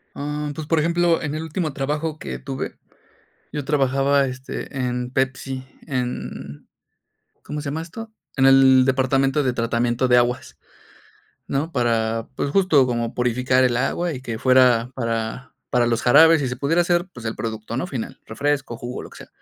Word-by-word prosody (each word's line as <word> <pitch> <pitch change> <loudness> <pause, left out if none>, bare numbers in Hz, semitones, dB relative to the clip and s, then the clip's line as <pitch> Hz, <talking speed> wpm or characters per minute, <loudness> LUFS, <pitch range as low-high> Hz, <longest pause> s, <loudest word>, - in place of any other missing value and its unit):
Em, 150 +1 -3
pues, 155 +1 -6
por 165 +1 +2
ejemplo, 170 +1 +2
en 150 -1 -3
el 155 - -3
último 160 -1 -3
trabajo 150 +3 -2
que 65 - -6
tuve, 65 +1 -5 0.8
yo 150 -2 -4
trabajaba, 140 0 +2
este, 130 +2 -7
en 125 -1 -2
Pepsi, 130 0 -2 0.2
en, 125 - -5 0.8
¿cómo 150 0 -5
se 145 - -8
llama 150 +3 -3
esto? 225 +7 -9 0.3
En 135 - +4
el 135 -1 +7
departamento 135 +2 +2
de 130 -2 +1
tratamiento 120 +1 0
de 125 - +5
aguas, 120 0 0 0.9
¿no? 145 +4 -2
Para, 115 -3 0
pues, 140 - -2
justo 155 -6 +4
como 120 -1 -2
purificar 125 +1 +2
el 120 -2 +2
agua 170 +7 0
y 130 - -6
que 115 -3 -5
fuera 125 -1 +4
para 115 +1 -3 0.2
para 120 -1 +3
los 120 0 0
jarabes 160 +5 +6
y 135 - -1
se 125 - -4
pudiera 145 +6 +1
hacer, 175 0 +1
pues, 120 - -10
el 110 - -3
producto 110 0 -5
¿no? 135 - -2
final, 130 -10 -6
refresco, 140 +1 -2
jugo, 120 +2 -6
lo - - -11
que - - -13
sea. - - -12
130 Hz, 175 wpm, -22 LUFS, 120-150 Hz, 0.9 s, el